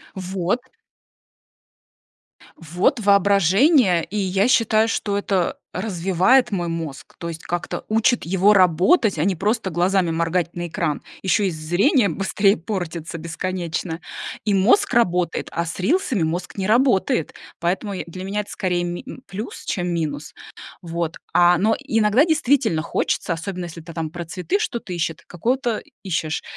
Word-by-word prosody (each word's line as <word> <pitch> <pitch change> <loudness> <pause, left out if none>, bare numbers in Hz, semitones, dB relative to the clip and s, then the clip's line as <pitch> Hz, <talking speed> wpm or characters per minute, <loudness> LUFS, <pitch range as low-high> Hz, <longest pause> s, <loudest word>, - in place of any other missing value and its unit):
Вот. 185 +3 -1 2.0
Вот 175 - 0
воображение, 200 - +4
и 195 +7 -6
я 195 +1 +1
считаю, 225 -3 +3
что 205 -2 -1
это 195 -3 0 0.2
развивает 190 +6 +2
мой 175 -4 -1
мозг. 165 -4 -6
То 170 - -5
есть 165 -1 -7
как-то 175 +1 -4
учит 225 +3 +2
его 190 +4 +4
работать, 190 - +4
а 155 - +1
не 190 -1 +1
просто 210 +2 0
глазами 180 +1 +1
моргать 170 +1 0
на 175 0 -4
экран. 160 -2 -2 0.2
Ещё 195 +2 +2
и - - +2
з 170 - -5
зрение 205 - +3
быстрее 200 +1 +2
портится 170 -3 -5
бесконечно. 170 0 -4 0.4
И 210 - +1
мозг 200 - +3
работает, 180 -7 +1
а 170 - -1
с 170 - -6
рилсами 255 - +1
мозг 175 +5 -3
не 190 -1 -1
работает, 240 - +2 0.3
поэтому 190 +4 -1
я 185 - -3
и 170 - -11
для 185 +2 -7
меня 205 +2 -1
это 205 - -13
скорее 180 -2 -1
ми 175 0 -4
м, 260 - -9
плюс, 210 +4 -7
чем 180 -2 -2
минус. 150 -3 -3 0.5
Вот, 170 -1 -3 0.2
а, 175 0 +5
но 215 +6 +2
и 265 -5 -1
иногда 215 +7 +4
действительно 285 - +2
хочется, 165 - -1
особенно 180 +2 -5
если 165 0 -9
ты 165 +1 -11
там 160 -2 -3
про 175 +2 -6
цветы 185 - -2
что-то 235 - -4
ищет 165 -2 -2
какого-то 240 +5 -1 0.2
ищешь, 160 -4 -2
185 Hz, 155 wpm, -22 LUFS, 170-210 Hz, 2.0 s, а